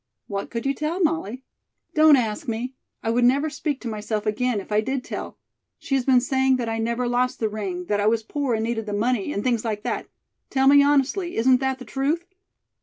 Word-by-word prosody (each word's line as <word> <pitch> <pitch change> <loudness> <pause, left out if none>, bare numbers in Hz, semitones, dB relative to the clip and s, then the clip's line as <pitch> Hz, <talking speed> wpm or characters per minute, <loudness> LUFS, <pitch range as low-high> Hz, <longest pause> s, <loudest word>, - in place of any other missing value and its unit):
"What 200 0 -4
could 230 +1 -4
you 275 - +2
tell, 305 +5 -3
Molly?" 310 - -1 0.5
"Don't 310 -1 +7
ask 245 +3 -1
me. 235 +3 -3 0.3
I 225 - 0
would 240 +1 +2
never 280 +5 +3
speak 290 -3 -3
to 250 - -5
myself 215 -1 -3
again, 225 +1 0
if 195 - -10
I 210 0 +3
did 265 +3 -2
tell. - - -6 0.4
She - - -5
has 265 -2 +2
been 255 -2 +5
saying 265 +1 +2
that 245 -2 -2
I 225 0 -2
never 235 +2 -1
lost 250 +1 0
the 220 - +1
ring, 195 -4 -4
that 205 +2 0
I 205 - +2
was 225 0 +2
poor 270 +1 -1
and 220 - -1
needed 225 -1 -2
the 205 - -3
money, 230 +3 0
and 205 - -2
things 240 -3 +1
like 215 -2 -3
that. - - -3 0.4
Tell 265 0 +2
me 285 +1 +8
honestly, 290 +6 +1
isn't 255 +3 +5
that 265 0 -1
the 255 - -10
truth?" 280 +8 -1
250 Hz, 225 wpm, -24 LUFS, 220-275 Hz, 0.5 s, me